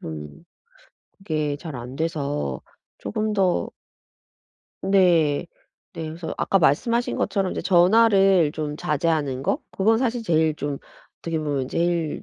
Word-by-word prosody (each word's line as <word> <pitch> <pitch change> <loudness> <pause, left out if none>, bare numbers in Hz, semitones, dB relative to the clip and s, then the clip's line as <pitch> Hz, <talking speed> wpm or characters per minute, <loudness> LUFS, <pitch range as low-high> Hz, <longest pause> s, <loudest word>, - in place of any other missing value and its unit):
좀 75 - -8 0.7
그게 155 -6 -2
잘 155 -1 -8
안 125 +3 -8
돼서 145 - -2 0.4
쪼금 215 0 -2
더 190 -3 +1 1.1
네. 175 -5 +3 0.5
네. 165 -2 -6
그래서 160 +1 -6
아까 195 - +2
말씀하신 230 - +1
것처럼 195 -2 0
이제 - - -3
전화를 195 -3 +4
좀 150 -1 -4
자제하는 150 -4 -1
거 270 - 0
그건 220 +3 +2
사실 245 -2 -1
제일 160 -6 +2
좀 145 -1 -4 0.4
어떻게 165 -1 -3
보면 145 -4 -2
제일 170 -2 -1
165 Hz, 240 characters per minute, -23 LUFS, 145-195 Hz, 1.1 s, 전화를